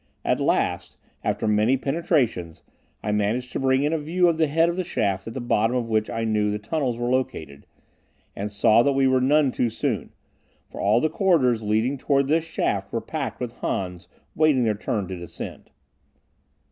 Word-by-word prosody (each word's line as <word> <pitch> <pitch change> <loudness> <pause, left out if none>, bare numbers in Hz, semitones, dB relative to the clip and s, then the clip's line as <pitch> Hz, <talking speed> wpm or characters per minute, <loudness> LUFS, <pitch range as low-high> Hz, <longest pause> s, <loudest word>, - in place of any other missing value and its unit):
At - - +1
last, - - 0 0.3
after - - -1
many 105 +5 +3
penetrations, 135 - -1 0.4
I 105 - -1
managed 105 +5 -1
to - - -3
bring 135 0 +2
in 150 +2 +1
a 160 - 0
view 175 +4 +1
of 165 -2 +2
the 160 - +3
head 165 +3 +3
of 170 - -1
the 185 - -1
shaft 95 - -1
at 115 - -7
the - - -3
bottom 120 0 +1
of 120 -2 -1
which 110 -1 +1
I 115 - -2
knew 105 -2 +1
the 105 - -1
tunnels 125 +2 -2
were 120 +1 -1
located, 80 - -3 0.7
and 100 +2 -4
saw 110 +2 +4
that 140 +3 +2
we 135 0 +2
were 130 -1 +3
none 140 +1 +3
too 120 -1 0
soon, - - -3 0.6
for - - -8
all 105 +4 +3
the - - +3
corridors 155 - +2
leading 110 +6 0
toward 140 0 +1
this 160 +1 +3
shaft 100 -11 -2
were 115 - -1
packed 140 +5 -5
with 125 -2 -4
Hans 90 -1 -3 0.3
waiting 155 -5 +3
their 110 -2 +2
turn 105 -1 -3
to 95 - -4
descend. 85 -1 -8
120 Hz, 195 wpm, -24 LUFS, 105-145 Hz, 0.7 s, saw